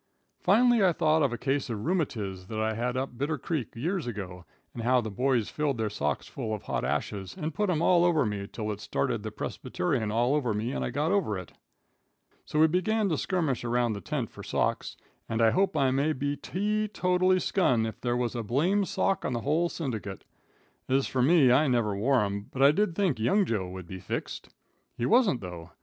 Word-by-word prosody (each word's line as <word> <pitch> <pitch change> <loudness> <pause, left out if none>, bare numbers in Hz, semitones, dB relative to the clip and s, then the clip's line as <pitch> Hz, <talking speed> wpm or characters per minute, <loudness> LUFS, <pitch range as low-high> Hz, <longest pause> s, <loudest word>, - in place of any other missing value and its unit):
Finally 230 +3 +4
I 180 -2 +4
thought 155 -1 +2
of 140 -4 +2
a 120 - -3
case 135 +3 -1
of 110 -1 -4
rheumatiz 110 - -2
that 110 +1 -4
I 110 0 0
had 125 +3 -2
up 135 +1 -2
in 120 - -17
Bitter 150 +4 -1
Creek 145 -4 -4
years 165 +5 -2
ago, 95 -6 -6 0.3
and 120 - -6
how 125 +2 +3
the 110 -3 -4
boys 125 0 +1
filled 145 -4 -1
their 110 -2 -1
socks 75 -8 -2
full 110 -5 -4
of 105 - -10
hot - - -2
ashes 95 -2 -3
and 160 -3 -3
put 210 +4 0
'em 165 -2 +1
all 175 -1 +5
over 165 -5 +3
me 100 -2 -3
till 110 -2 -3
it 105 - -5
started - - -1
the - - -4
persbyterian 105 +4 -2
all 120 +4 +2
over 125 -8 0
me 110 +4 -2
and - - -2
I - - -2
got 150 +3 0
over 190 - +1
it. 90 -2 -8 0.9
So 150 - -2
we 160 - +7
begun 195 +6 +1
to 160 - 0
skirmish 160 -11 -1
around 120 -1 +1
the 100 - -6
tent 145 -7 -3
for - - -11
socks, - - -1 0.3
and 115 - -1
I 115 -1 +5
hope 190 - +1
I 135 -2 +3
may 140 +4 +1
be 145 +1 -2
tee 210 +8 -1
totally 185 -2 +2
skun 125 - +2
if 110 - -6
there 120 -1 0
was 120 -2 -1
a 120 - -2
blame 165 - +1
sock 195 0 0
in - - -1
the 120 - -2
whole 160 +7 +1
syndicate. 110 - -5 0.7
Ez 135 +1 +2
fur 130 - -1
me, 140 -1 +5
I 145 +5 +4
never 115 -5 +1
wore 125 +5 +2
'em, 100 0 -3
but 135 - 0
I 140 - +8
did 180 +1 0
think 180 - +1
young 190 - +3
Joe 100 - -2
would 95 -1 -8
be 95 +2 -8
fixed. - - -5 0.5
He 120 - -1
wasn't 220 - +3
though. 90 -3 -8
130 Hz, 220 wpm, -28 LUFS, 110-165 Hz, 0.9 s, I